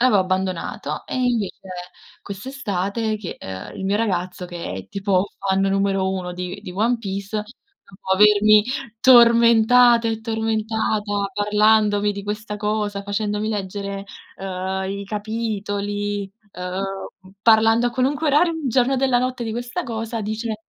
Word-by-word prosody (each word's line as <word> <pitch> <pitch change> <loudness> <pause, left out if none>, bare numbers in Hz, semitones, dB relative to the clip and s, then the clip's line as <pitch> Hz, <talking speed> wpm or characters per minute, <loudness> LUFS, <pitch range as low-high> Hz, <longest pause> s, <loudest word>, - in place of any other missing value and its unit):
avevo 250 -4 +4
abbandonato 185 -1 -2
e - - -4
invece 240 -6 0 0.6
quest'estate 215 -1 -3
che, 195 -5 -7
uhm, 95 -1 -8
il 190 - -5
mio 200 +2 +1
ragazzo, 180 -4 -2
che 175 -1 -6
è 95 0 -7
tipo 195 -1 0
fan 195 0 0
numero 195 -1 +1
1 180 -2 -4
di 180 0 -6
di - - -7
One 225 +6 +1
Piece, 200 -1 -4 0.5
dopo 190 -1 -4
avermi 210 +1 +6 0.4
tormentata 235 -1 +6
e 225 0 -2
tormentata 220 -2 -1
parlandomi 210 0 +3
di 200 0 -6
questa 210 0 -4
cosa, 210 -1 -2
facendomi 210 +1 -2
leggere, 200 -1 -4 0.3
uhm, 190 0 -3
i 200 +1 -4
capitoli, 205 -1 -3 0.2
uhm, 190 +1 -6
parlando 225 +1 +5
a - - -7
qualunque 275 +5 0
orario 330 +4 +4
del 315 -4 -3
giorno 255 +2 +3
e - - 0
della 260 -2 +3
notte 255 0 -2
di 225 - -3
questa 245 +8 -4
cosa, 225 -2 -4
dice: 220 +1 -4
210 Hz, 140 wpm, -22 LUFS, 195-225 Hz, 0.6 s, avermi